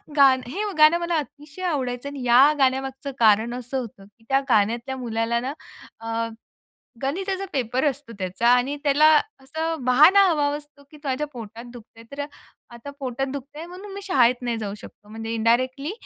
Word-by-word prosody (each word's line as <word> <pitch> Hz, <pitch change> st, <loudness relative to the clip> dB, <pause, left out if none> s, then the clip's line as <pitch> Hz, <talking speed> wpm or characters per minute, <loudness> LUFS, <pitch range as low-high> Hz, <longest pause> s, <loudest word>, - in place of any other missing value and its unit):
गानं 270 Hz, -3 st, +5 dB
हे 400 Hz, +8 st, -3 dB
गाणं 310 Hz, +2 st, +6 dB
मला 345 Hz, 0 st, -1 dB
अतिशय 295 Hz, +3 st, -7 dB
आवडायचं 265 Hz, -5 st, -2 dB
आणि 280 Hz, -2 st, -7 dB
या 260 Hz, +5 st, +6 dB
गाण्यामागचं 270 Hz, +1 st, 0 dB
कारण 220 Hz, +1 st, +4 dB
असं 250 Hz, +2 st, -5 dB
होतं, 215 Hz, -5 st, -9 dB
की 205 Hz, +3 st, -25 dB
त्या 270 Hz, 0 st, +4 dB
गाण्यातल्या 235 Hz, +4 st, +1 dB
मुलाला 235 Hz, -1 st, -1 dB
ना 265 Hz, +4 st, -4 dB, 0.5 s
अ, 230 Hz, 0 st, -2 dB, 0.8 s
गणिताचा 380 Hz, +7 st, -2 dB
पेपर 255 Hz, +1 st, 0 dB
असतो 280 Hz, -4 st, -2 dB
त्याचा 190 Hz, +5 st, -1 dB
आणि 250 Hz, +3 st, +3 dB
त्याला 290 Hz, +1 st, +4 dB, 0.4 s
असं 320 Hz, +1 st, -3 dB
बहाणा 305 Hz, +11 st, +6 dB
हवा 305 Hz, -5 st, +1 dB
असतो 295 Hz, -1 st, -12 dB
की 305 Hz, -, -13 dB
त्याच्या 270 Hz, +1 st, -1 dB
पोटात 230 Hz, -4 st, -10 dB
दुखतंय. 230 Hz, -1 st, -14 dB
तर 280 Hz, -, -9 dB, 0.6 s
आता 235 Hz, +4 st, -9 dB
पोटात 265 Hz, 0 st, -3 dB
दुखतंय 285 Hz, +3 st, -8 dB
म्हणून 375 Hz, +3 st, -10 dB
मी 400 Hz, -, -7 dB
शाळेत 255 Hz, -10 st, +3 dB
नाही 240 Hz, -2 st, -2 dB
जाऊ 205 Hz, -3 st, -4 dB
शकतो. 205 Hz, -, -15 dB
म्हणजे 225 Hz, +1 st, -6 dB
इंडायरेक्टली 255 Hz, +6 st, +1 dB
265 Hz, 165 wpm, -23 LUFS, 235-295 Hz, 0.8 s, गाणं